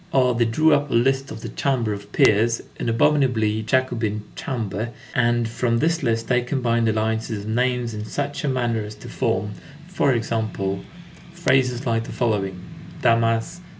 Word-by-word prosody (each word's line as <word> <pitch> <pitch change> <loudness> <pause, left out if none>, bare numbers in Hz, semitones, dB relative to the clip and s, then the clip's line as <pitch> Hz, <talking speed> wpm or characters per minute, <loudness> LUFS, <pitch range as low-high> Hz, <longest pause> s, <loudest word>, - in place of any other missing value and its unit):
21 130 -5 +3
Or 125 - +2
they 120 0 +3
drew 155 +8 +3
up 145 0 +1
a - - 0
list 135 +3 +2
of 110 - -8
the 115 - -6
chamber 120 -3 0
of 100 0 -9
peers, 115 +3 +3 0.2
"an - - -1
abominably 115 -3 +2
Jacobin 115 -3 0
chamber," 110 -3 -3 0.2
and 120 -1 +2
from 115 +1 0
this 165 +6 +1
list 115 -3 0
they 125 -1 +3
combined 120 -3 +1
alliances 110 -1 -1
of - - -8
names, 125 0 0
in 105 0 -5
such 145 +6 -3
a - - 0
manner 120 -3 0
as 105 0 -7
to 105 - -12
form, 105 +2 -1 0.4
for 175 -6 +1
example, 110 -4 -2 0.5
phrases 130 -6 +1
like 115 -2 0
the - - -8
following: 100 -6 -1 0.4
_Damas. 115 +6 +2
115 Hz, 170 wpm, -23 LUFS, 110-130 Hz, 0.5 s, 21